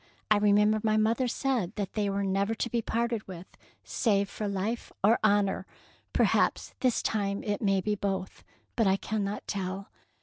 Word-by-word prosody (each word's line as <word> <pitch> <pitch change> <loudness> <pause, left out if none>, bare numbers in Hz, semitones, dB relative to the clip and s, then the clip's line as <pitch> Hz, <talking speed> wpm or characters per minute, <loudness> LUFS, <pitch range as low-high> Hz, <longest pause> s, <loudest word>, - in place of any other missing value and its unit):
I 215 - +7
remember 210 +1 +4
my 215 0 +2
mother 225 +4 +2
said 240 -7 -1
that 200 -3 -3
they 205 -2 0
were 200 0 -1
never 200 +3 0
to 240 - -2
be 235 - +1
parted 230 -1 -1
with 180 -1 -8 0.4
save 200 -4 +1
^ - - -19
for 210 - -3
life 200 +4 -3
or 220 +4 +5
honour.' 200 -2 +2 0.4
Perhaps - - +2
this 255 -3 +1
time 200 -2 -1
it 205 -1 -2
may 195 -3 +2
be 210 +2 0
both, 195 -2 -3 0.3
but 225 -3 +3
I 190 - +4
cannot 210 -1 -3
tell." 195 0 -4
205 Hz, 175 wpm, -29 LUFS, 195-220 Hz, 0.4 s, I